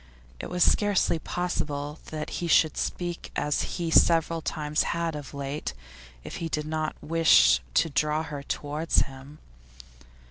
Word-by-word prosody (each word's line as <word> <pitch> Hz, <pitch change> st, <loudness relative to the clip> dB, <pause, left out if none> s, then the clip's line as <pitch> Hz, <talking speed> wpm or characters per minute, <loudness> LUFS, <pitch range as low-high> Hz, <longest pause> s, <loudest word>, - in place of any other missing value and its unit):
It -, -, -6 dB
was 180 Hz, 0 st, +2 dB
scarcely 205 Hz, -5 st, +2 dB
possible 150 Hz, -4 st, -3 dB
that 155 Hz, -1 st, -5 dB
he 170 Hz, -, -1 dB
should 160 Hz, -1 st, +4 dB
speak 175 Hz, -1 st, -4 dB
as 150 Hz, 0 st, -1 dB
he 170 Hz, -2 st, -2 dB
several 165 Hz, 0 st, +4 dB
times 150 Hz, -1 st, -1 dB, 0.2 s
had 165 Hz, -2 st, -1 dB
of 145 Hz, -1 st, -7 dB
late 140 Hz, -, -4 dB, 0.5 s
if -, -, -7 dB
he 165 Hz, -, -4 dB
did 150 Hz, -1 st, -2 dB
not 155 Hz, 0 st, -2 dB
wish 165 Hz, +1 st, +5 dB
to -, -, +4 dB
draw 150 Hz, +1 st, 0 dB
her 145 Hz, -3 st, -6 dB
towards 150 Hz, +3 st, 0 dB
him. 135 Hz, +2 st, -11 dB
155 Hz, 145 wpm, -27 LUFS, 150-165 Hz, 0.5 s, wish